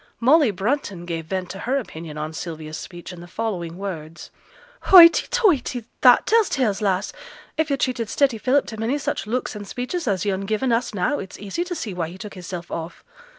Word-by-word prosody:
Molly 280 +3 +5
Brunton 200 -2 -2
gave 165 -2 -4
vent 185 0 -3
to 195 - -8
her 255 +7 0
opinion 160 - -6
on 155 +1 -4
Sylvia's 160 -2 -6
speech 175 +1 -9
in 175 - -10
the 175 - -10
following 175 -5 -4
words: 170 -5 -7 0.5
'Hoighty 340 -3 +9
toighty! 335 - +1 0.2
That 250 -2 +7
tells 450 -2 +3
tales, 220 -7 0
lass. 195 -1 0 0.4
If 315 0 0
yo' 280 - +2
treated 245 -5 -1
steady 265 -6 +2
Philip 265 +4 +2
to 220 - -8
many 235 +6 0
such 280 - -3
looks 245 0 -2
an' 205 -1 -7
speeches 250 - -4
as 195 -2 0
yo'n 195 -1 -1
given 220 +4 0
us 230 -1 0
now, 190 +10 0
it's 190 - -8
easy 205 - -3
t' 355 0 -5
see 220 - -4
why 170 -2 -2
he 180 - -10
took 205 +2 -8
hisself 175 -1 -7
off. 165 +1 -6
210 Hz, 200 wpm, -23 LUFS, 180-260 Hz, 0.5 s, Hoighty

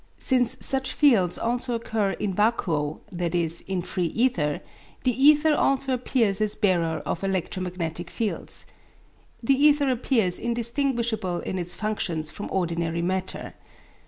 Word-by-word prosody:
Since 250 -3 +2
such 265 -1 +2
fields 220 - +3
also 240 +1 -1
occur 220 -3 -1
in 200 -2 -3
vacuo 170 -8 0 0.2
i.e. 170 -2 0 0.2
in 180 -2 -1
free 180 -1 -2
ether 165 - 0 0.4
the 255 - +3
ether 295 +4 +5
also 275 -2 +1
appears 230 -5 0
as 215 -1 +2
bearer 170 -7 +1
of 175 - -3
electromagnetic 180 -2 -3
fields. 220 +2 0 0.8
The 275 - +4
ether 285 0 +4
appears 225 -7 +1
indistinguishable 235 -5 -1
in 185 - -3
its 175 0 -2
functions 175 -8 -2
from 205 - -6
ordinary 170 -2 -1
matter. 185 +1 -3
205 Hz, 130 wpm, -25 LUFS, 175-245 Hz, 0.8 s, ether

